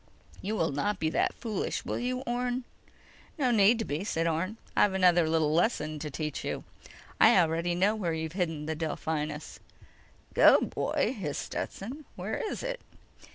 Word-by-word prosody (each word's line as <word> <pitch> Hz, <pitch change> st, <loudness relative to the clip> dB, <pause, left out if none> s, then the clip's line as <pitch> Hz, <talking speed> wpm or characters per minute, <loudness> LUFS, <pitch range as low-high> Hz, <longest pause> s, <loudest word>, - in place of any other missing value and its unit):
"You 210 Hz, +3 st, -2 dB
will 165 Hz, -7 st, +1 dB
not 200 Hz, +9 st, -1 dB
be 160 Hz, -2 st, 0 dB
that -, -, +2 dB
foolish, 220 Hz, -5 st, -3 dB
will -, -, -2 dB
you, 255 Hz, +1 st, -2 dB
Orne?" 245 Hz, 0 st, -2 dB, 0.7 s
"No 260 Hz, -5 st, +2 dB
need 220 Hz, +1 st, +5 dB
to 225 Hz, -, -2 dB
be," 145 Hz, +5 st, -2 dB
said 165 Hz, -6 st, -1 dB
Orne. 170 Hz, +6 st, -1 dB, 0.2 s
"I've 205 Hz, -, +4 dB
another 175 Hz, -3 st, +4 dB
little 160 Hz, -2 st, +2 dB
lesson 155 Hz, -4 st, +1 dB
to 150 Hz, +1 st, -4 dB
teach 150 Hz, +1 st, -4 dB
you: -, -, -3 dB, 0.6 s
I -, -, +7 dB
already 170 Hz, +1 st, +2 dB
know 195 Hz, +4 st, +3 dB
where 175 Hz, -6 st, -1 dB
you've 160 Hz, 0 st, -3 dB
hidden 165 Hz, -4 st, -2 dB
the 160 Hz, -, -1 dB
Delphinus." 155 Hz, -1 st, -3 dB, 0.7 s
"Go, -, -, +7 dB
boy!" -, -, -1 dB
hissed 155 Hz, -10 st, -3 dB
Stetson. 265 Hz, +10 st, -5 dB
_"Where -, -, -3 dB
is -, -, -5 dB
it?" -, -, -3 dB
175 Hz, 165 wpm, -29 LUFS, 160-220 Hz, 0.7 s, I